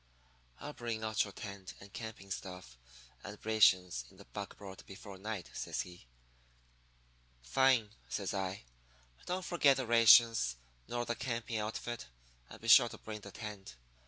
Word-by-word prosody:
"'I'll 150 - -6
bring 115 -3 -4
out 110 0 +2
your 100 - -7
tent 100 -1 -8
and 100 0 -14
camping 110 -4 -7
outfit 90 -9 -9 0.5
and 105 0 -7
rations 95 - +4
in - - -20
the - - -13
buckboard 95 -2 -8
before 95 0 -10
night,' 105 -3 -5
says - - -2
he. 90 -8 -11 1.4
"'Fine,' 120 - +3 0.2
says 100 -2 -2
I. 95 -3 -3 0.6
'And - - -21
don't 185 0 -2
forget 145 -6 +4
the 130 - -1
rations. 115 - +6 0.3
Nor 120 0 -2
the 120 - -1
camping 115 -3 -3
outfit. 110 +2 -4 0.4
And - - -11
be 115 - -8
sure 120 +1 +8
to - - -9
bring 110 -1 -7
the 100 - -9
tent. 105 - -8
110 Hz, 155 wpm, -34 LUFS, 95-120 Hz, 1.4 s, sure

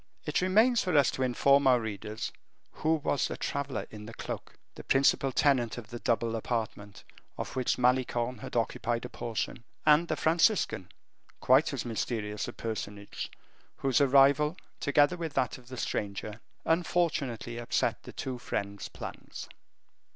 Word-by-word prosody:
It 150 - +1
remains 220 +6 +4
for 180 -5 +2
us 140 - +5
to - - -5
inform 140 +2 +4
our 125 -2 +6
readers 110 +1 -5 0.4
who 160 +1 +1
was 145 -2 0
the - - -5
traveler 140 -1 -3
in 105 0 -9
the 115 - -9
cloak - - -6 0.2
the - - -10
principal 135 0 +3
tenant 125 -4 +2
of 115 -1 -9
the 120 - -5
double 115 -1 0
apartment, 110 -3 -4 0.3
of - - -5
which 130 -2 +1
Malicorne 125 -1 +1
had - - -8
only 115 - +5
occupied 120 +1 -3
a - - -6
portion 115 +1 -4 0.2
and 155 +3 +5
the - - 0
Franciscan, 160 - +2 0.5
quite - - +4
as - - -3
mysterious 110 -3 -2
a 120 - -6
personage, 105 -2 -5 0.5
whose 135 +2 +2
arrival, 140 +4 +5 0.2
together 145 +4 +3
with 165 -3 -5
that 130 -1 0
of 120 - -19
the 130 0 -8
stranger, 105 0 -3 0.2
unfortunately 150 -9 0
upset 120 - 0
the - - -10
two 130 -2 -5
friends' 100 -3 -4
plans. - - -8
125 Hz, 155 wpm, -30 LUFS, 115-145 Hz, 0.5 s, our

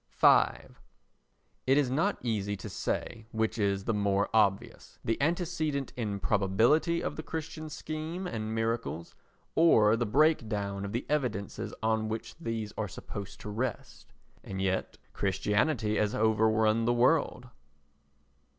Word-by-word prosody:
v - - +7 1.2
It 135 +2 +5
is 135 -4 +2
not 170 +10 +1
easy 100 -4 -1
to - - -7
say 110 -1 -3
which 110 0 -1
is 100 -1 +1
the 115 - 0
more 100 -1 +1
obvious, 100 -3 +1
the 115 +3 0
antecedent 155 -3 -1
improbability 110 - +2
of - - -3
the - - -3
Christian 160 -1 -6
scheme 155 +4 -5
and 110 -8 -3
miracles, 115 -7 -2 0.4
or 115 -10 +5
the 115 0 -1
breakdown 105 -8 +1
of 100 - -5
the 120 +3 -2
evidences 125 -10 -2
on 110 0 +1
which 110 +1 -5
these 115 -8 -4
are 105 - -1
supposed 100 +1 -8
to 105 - -7
rest. 120 +3 -4 0.3
And 95 -1 -6
yet 95 -1 -1 0.2
Christianity 105 +4 +1
has 105 -1 +1
overrun 110 0 +3
the 120 - +3
world. 120 +2 +2
110 Hz, 130 wpm, -30 LUFS, 105-140 Hz, 1.2 s, v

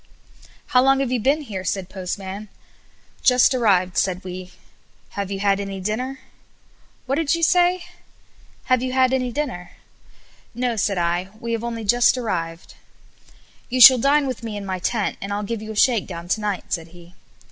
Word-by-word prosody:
"How 250 - +5
long 270 +1 +4
have 265 -2 -1
you 250 - +1
been 275 +7 +1
here?" 200 -9 -6
said 190 0 -2
Postman. 195 +2 -6 0.7
"Just 250 0 +4
arrived," 190 -7 +2
said 185 -1 -1
we. 185 0 -8 0.6
"Have 200 -1 -5
you 195 -1 -4
had 200 -1 +2
any 195 -1 -5
dinner?" 235 +8 -3 0.9
"What 275 +2 -1
did 325 0 +1
you 335 - -3
say?" 355 +1 +3 0.8
"Have 255 -1 +2
you 255 0 -3
had 260 0 +3
any 255 -2 0
dinner?" 235 -11 -4 0.8
"No," 245 -1 -1
said 200 -2 0
I, 175 +2 -1
"we 235 0 -5
have 230 0 -2
only 230 -1 -4
just 240 +4 +3
arrived. 170 -8 -4 1.0
"You 255 +1 -1
shall 255 +1 +10
dine 280 +3 +3
with 255 -3 -4
me 225 -3 -5
in 200 - -6
my 190 -1 -3
tent, 205 +3 -1
and 195 - -5
I'll 205 +1 -2
give 220 +1 -4
you 220 0 -7
a - - -7
shakedown 195 -8 +1
to 215 - 0
night," 205 -3 -3
said 165 -2 -3
he. 175 +1 -16
215 Hz, 180 wpm, -22 LUFS, 190-255 Hz, 1.0 s, shall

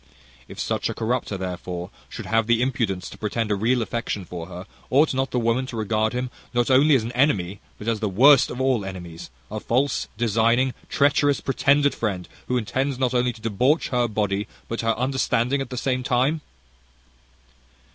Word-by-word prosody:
If - - -11
such - - -1
corrupter, 115 -3 -1
therefore, 90 -1 -5 0.2
should - - -7
have 115 0 +1
the 120 0 +3
impudence 115 -8 -1
to - - -12
pretend 110 +1 -2
a - - +3
real 115 +4 +1
affection 110 -4 -3
for 85 -1 -7
her, 90 0 -8 0.2
ought 145 +4 +4
not 135 +1 0
the - - -2
woman 120 +2 +1
to 120 - -6
regard 110 +1 0
him 125 0 -3 0.2
not 120 +2 +2
only 140 +3 +6
as 125 - +2
an 115 - -4
enemy, 105 -8 +1 0.2
but 105 - -9
as 115 -2 +1
the 105 -1 -1
worst 135 +8 +6
of 125 - -6
all 130 -5 +1
enemies, 90 -3 -8 0.2
a 110 - -3
false, 130 +6 0
designing, 115 +3 +2 0.2
treacherous, 145 0 +3
pretended 140 +1 +2
friend, 95 -6 -3 0.2
who 125 - +1
intends 130 +4 -1
not 130 -1 0
only 125 0 +2
to 115 - -14
debauch 125 +8 +1
her 125 -1 +1
body, 105 -2 -1 0.2
but 115 - -3
her 115 -1 0
understanding 130 0 +1
at 135 - -5
the 125 - -6
same 130 0 0
time?" 130 +4 +1
120 Hz, 185 wpm, -24 LUFS, 105-130 Hz, 0.2 s, only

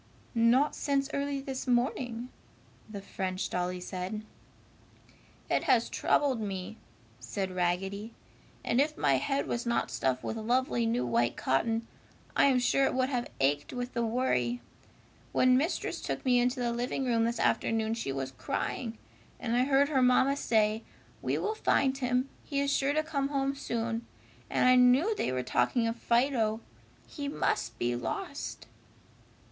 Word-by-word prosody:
"Not 240 +5 +3
since 275 -1 0
early 280 0 -1
this 265 -1 -5
morning," 245 -1 0 0.6
the 200 -2 -7
French 185 -1 -3
dolly 180 0 -1
said. 185 +4 -5 1.2
"It - - 0
has - - +3
troubled 270 -6 +1
me," 195 +1 -5 0.4
said 185 - -3
Raggedy, 190 +5 -2 0.5
"and 245 - +3
if 305 +2 0
my 140 -3 +3
head 275 - -1
was 240 0 -3
not 235 - 0
stuffed 125 +2 -1
with 225 - -3
lovely 240 +1 +1
new 225 - 0
white 120 0 +1
cotton, 225 - 0 0.5
I - - +5
am 270 -2 +4
sure 260 +2 +3
it - - 0
would 260 0 +1
have 245 -3 -2
ached 145 +2 +1
with 245 0 -4
the 235 - 0
worry! 125 - 0 0.7
When 255 0 +5
Mistress 305 +8 -1
took - - -4
me 250 -1 +4
into 250 +2 +1
the 240 -1 0
living 245 +3 -2
room 230 -2 +2
this 235 +1 -1
afternoon 225 0 +1
she 225 -12 -3
was 135 -1 -3
crying, 225 - -3 0.4
and 235 -1 -1
I 250 +1 +3
heard 280 +1 +3
her 270 -4 +2
mamma 255 +2 +4
say, 220 -4 +1 0.4
'We - - 0
will 425 - -1
find 270 -10 +2
him! 250 0 0 0.2
He 280 -2 -2
is 280 0 +1
sure 280 +1 +1
to 310 +1 +1
come 285 -3 -1
home 275 -1 0
soon!' 235 -3 -3 0.4
and - - +2
I 255 - +7
knew 255 - +5
they 130 - -1
were 130 0 -1
talking 230 - +1
of 230 0 -1
Fido! 235 -2 +1 0.4
He 285 -2 -6
must 285 - -1
be 120 0 0
lost!" 120 - -5
235 Hz, 160 wpm, -30 LUFS, 200-265 Hz, 1.2 s, I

